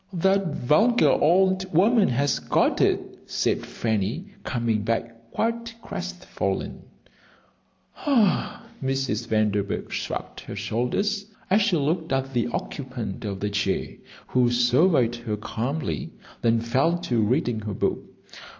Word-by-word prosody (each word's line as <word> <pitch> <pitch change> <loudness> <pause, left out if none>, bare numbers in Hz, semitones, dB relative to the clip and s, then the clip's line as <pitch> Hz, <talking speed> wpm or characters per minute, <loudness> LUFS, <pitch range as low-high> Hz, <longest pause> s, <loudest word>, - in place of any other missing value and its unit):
"That 190 -1 +2
vulgar 220 - +4
old 185 +3 +3
woman 205 +6 +4
has 140 +3 +1
got - - +1
it," - - 0
said - - 0
Fanny, 115 - -2
coming 115 -4 0
back 115 +1 -3
quite 230 - -2
crestfallen. - - -4 1.3
"Ugh!" 230 -6 +2 0.2
Mrs. 135 -4 -1
Vanderburgh 105 -2 0
shrugged - - -4
her - - -8
shoulders 125 - -1 0.2
as 205 +3 +5
she 200 -4 +2
looked 160 +3 -1
at 135 0 -1
the 120 -1 +1
occupant 120 -5 -5
of 100 -2 -4
the 105 0 -1
chair, 100 -1 0 0.4
who 125 -1 +3
surveyed 120 +1 +3
her 115 -3 -3
calmly, 125 +8 -3 0.3
then 115 -1 +3
fell 135 +9 +2
to 120 -9 0
reading 120 +1 +1
her 105 -1 -4
book. - - 0
130 Hz, 125 wpm, -25 LUFS, 115-180 Hz, 1.3 s, as